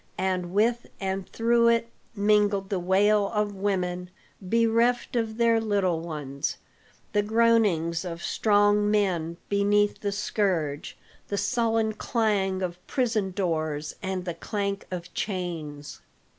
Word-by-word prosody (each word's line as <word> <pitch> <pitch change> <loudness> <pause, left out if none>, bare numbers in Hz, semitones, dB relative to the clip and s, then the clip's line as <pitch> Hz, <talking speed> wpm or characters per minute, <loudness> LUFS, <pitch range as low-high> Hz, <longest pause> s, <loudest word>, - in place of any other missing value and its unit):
And 185 -2 -1
with 230 +5 +1
and 190 -1 -3
through 235 0 +3
it, 230 0 +2 0.2
mingled 205 -1 +2
the 195 - 0
wail 200 +3 +3
of 210 -1 0
women 180 -2 -2 0.3
bereft 230 +5 +1
of 225 -2 -1
their 230 -1 +4
little 200 -6 +1
ones, 150 -4 -4 0.6
the 205 - +3
groanings 205 -7 +2
of 170 -2 -6
strong 205 -1 +3
men 175 -6 0
beneath 205 +1 +2
the 205 - -2
scourge, 185 -8 -1 0.3
the 200 - -2
sullen 225 +1 +1
clang 205 -4 0
of 175 -1 -4
prison 225 -6 0
doors, 155 -5 -2
and 190 -1 -3
the 175 - -2
clank 200 +1 -3
of 180 -1 -6
chains. 165 -7 -4
200 Hz, 125 wpm, -26 LUFS, 180-215 Hz, 0.6 s, their